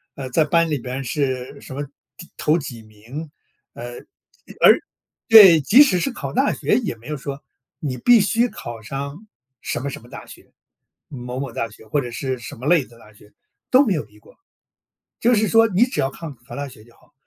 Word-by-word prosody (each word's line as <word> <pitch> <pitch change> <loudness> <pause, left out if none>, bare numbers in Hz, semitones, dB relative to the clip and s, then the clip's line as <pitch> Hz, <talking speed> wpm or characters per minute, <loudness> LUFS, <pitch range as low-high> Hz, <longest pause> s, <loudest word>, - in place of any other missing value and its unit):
呃， 135 -2 -6
在 160 - +3
班 165 +2 +2
里 145 - 0
边 130 +2 -5
是 130 0 -3
什 130 - -9
么 145 - -3 0.3
第 170 - -11
头 155 +2 +2
几 125 -7 -7
名， 115 +9 -10 0.4
呃， 120 +1 -8 0.6
而 - - +7 0.5
对， 195 -8 +9
即 235 - +7
使 190 -11 +1
是 270 - -1
考 - - -6
大 265 +3 +2
学 - - 0
也 215 - -4
没 115 +1 -20
有 150 - -3
说， 140 0 -7 0.4
你 135 -4 -3
必 240 - +6
须 230 +4 +2
考 120 - -8
上 140 - -7 0.3
什 - - -3
么 140 +3 -4
什 - - -8
么 120 - -17
大 - - -10
学， - - -15 0.6
某 125 -1 -7
某 135 -2 -4
大 115 0 -3
学， 110 +1 -16
或 145 +7 0
者 125 - -6
是 130 +2 -4
什 120 - -9
么 125 - -10
类 170 -3 +4
的 120 - -19
大 105 -2 -18
学， 105 0 -20 0.4
都 260 +3 +5
没 210 - +1
有 155 - -2
逼 105 0 -21
过。 - - -21 0.8
就 240 +2 +3
是 215 -1 +2
说 225 +1 +5
你 205 +4 +3
只 255 - -3
要 135 - 0
抗 155 -1 -9
考 - - -12
大 145 0 -4
学 125 -5 -14
就 120 +1 -22
好， - - -28
140 Hz, 230 characters per minute, -21 LUFS, 120-175 Hz, 0.8 s, 对